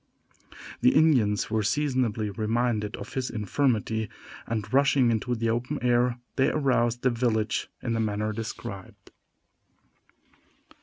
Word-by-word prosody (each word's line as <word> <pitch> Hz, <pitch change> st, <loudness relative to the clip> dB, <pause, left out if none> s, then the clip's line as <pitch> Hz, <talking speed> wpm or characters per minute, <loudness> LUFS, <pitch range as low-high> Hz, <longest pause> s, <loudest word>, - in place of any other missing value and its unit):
The 125 Hz, -, +4 dB
Indians 125 Hz, -11 st, +3 dB
were 110 Hz, 0 st, +1 dB
seasonably 115 Hz, -3 st, 0 dB
reminded 110 Hz, 0 st, -1 dB
of -, -, -9 dB
his 130 Hz, -1 st, -2 dB
infirmity, 110 Hz, -1 st, 0 dB, 0.4 s
and, 110 Hz, -1 st, -3 dB
rushing 135 Hz, -3 st, +4 dB
into 120 Hz, +2 st, -1 dB
the 115 Hz, 0 st, 0 dB
open 125 Hz, +6 st, -2 dB
air, 120 Hz, 0 st, +2 dB, 0.2 s
they 135 Hz, +2 st, +4 dB
aroused 120 Hz, -5 st, +1 dB
the 130 Hz, -, +3 dB
village 115 Hz, -2 st, 0 dB
in 115 Hz, -, -1 dB
the 115 Hz, -, 0 dB
manner 105 Hz, 0 st, -1 dB
described. 100 Hz, -3 st, -7 dB
115 Hz, 120 wpm, -27 LUFS, 110-125 Hz, 0.4 s, The